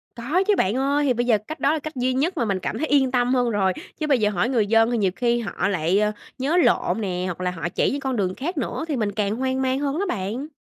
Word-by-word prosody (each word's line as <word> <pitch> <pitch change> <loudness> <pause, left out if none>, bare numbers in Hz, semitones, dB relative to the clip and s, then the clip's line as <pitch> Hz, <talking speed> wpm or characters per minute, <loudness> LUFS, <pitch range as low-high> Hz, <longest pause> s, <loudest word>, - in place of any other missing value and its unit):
Có 290 +11 0
chứ 420 - +5
bạn 195 +4 +1
ơi, 280 +3 +1
thì 260 - +3
bây 240 +1 -1
giờ 230 -3 +4
cách 310 - -6
đó 285 - +2
là 320 - -1
cách 310 +1 -7
duy 255 0 0
nhất 320 +8 0
mà 240 - +1
mình 195 -3 -1
cảm - - -3
thấy 315 - -1
yên 270 -3 +3
tâm 250 0 +2
hơn 245 -2 +2
rồi, 195 -4 +1 0.3
chứ 305 - -1
bây 275 -4 +3
giờ 210 -1 +2
hỏi 200 +3 0
người 230 -6 +1
dân 225 +2 +4
thì 240 - +1
nhiều 195 -4 +1
khi 240 -1 +1
họ 210 -2 -2
lại, 185 0 +1
ờ, 210 0 +2 0.3
nhớ 280 +7 0
lộn 285 -9 +2
nè, 180 -3 -2
hoặc 180 -1 -4
là 180 0 0
họ 175 -1 -4
chỉ - - +1
những 280 - -2
con 265 -2 -2
đường 185 -4 -1
khác 330 +8 -4
nữa 320 - -2
thì 305 - -1
mình 215 -5 -1
càng 205 +1 -1
hoang 260 +1 -1
mang 260 0 0
hơn 285 +2 -1
đó 400 - 0
bạn. 225 - -3
245 Hz, 300 wpm, -23 LUFS, 205-275 Hz, 0.3 s, chứ